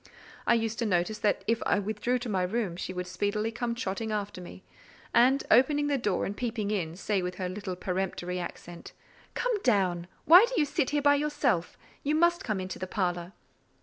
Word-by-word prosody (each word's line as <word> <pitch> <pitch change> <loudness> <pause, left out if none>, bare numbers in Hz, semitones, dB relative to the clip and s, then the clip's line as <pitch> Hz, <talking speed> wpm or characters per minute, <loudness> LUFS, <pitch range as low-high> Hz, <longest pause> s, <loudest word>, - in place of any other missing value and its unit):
I 235 - +5
used 225 -1 -1
to 235 - 0
notice 195 +3 0
that 210 - +1
if 230 +1 +1
I - - +2
withdrew 215 +5 -1
to 245 - -6
my 195 -4 0
room, 190 -1 -1
she 185 - -5
would 180 0 -4
speedily 205 +4 -1
come 235 0 -3
trotting 220 -1 -3
after 205 -3 -3
me, 180 +1 -11 0.5
and 260 +4 +4
opening 290 +5 +5
the 290 -1 +1
door 205 -6 0
and 200 - -4
peeping 220 -2 -2
in, 170 -6 -2
say, 195 +1 -1
with 180 0 -4
her 185 - -3
little 185 0 -5
peremptory 180 -1 -3
accent,—"Come 180 - -6
down. 185 - +1 0.2
Why 360 +8 +9
do - - -4
you 300 - +4
sit 285 -1 0
here 290 -1 0
by 285 0 +6
yourself? 285 - 0 0.3
You 295 +2 +1
must 345 +3 +3
come 215 -4 -2
into 185 0 -5
the 185 - -4
parlour." 180 -2 -2
210 Hz, 195 wpm, -29 LUFS, 185-250 Hz, 0.5 s, Why